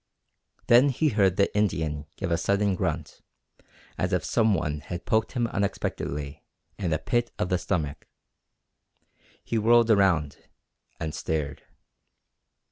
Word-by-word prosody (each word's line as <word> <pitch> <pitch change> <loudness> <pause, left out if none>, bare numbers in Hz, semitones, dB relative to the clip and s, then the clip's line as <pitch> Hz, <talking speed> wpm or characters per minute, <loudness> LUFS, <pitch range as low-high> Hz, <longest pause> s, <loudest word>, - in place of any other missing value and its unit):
Then 125 +4 +6
he 150 +4 +1
heard 100 -6 +2
the 100 0 +2
Indian 80 -8 0
give 95 -3 -4
a - - +4
sudden 100 +1 +1
grunt, 85 -4 -3 0.8
as 90 +1 0
if 90 - 0
some 110 -3 +2
one 75 -4 -2
had 85 +4 -7
poked 110 0 +1
him 120 -1 0
unexpectedly 75 -9 -3 0.4
in 95 -4 -1
the 80 - +1
pit 120 - 0
of 90 - -1
the 90 - +1
stomach. 75 -5 -3 1.4
He 115 - -1
whirled 115 +1 +5
about, 90 -8 +2 0.6
and 80 -2 -3
stared. 75 -2 -3
90 Hz, 130 wpm, -26 LUFS, 80-110 Hz, 1.4 s, Then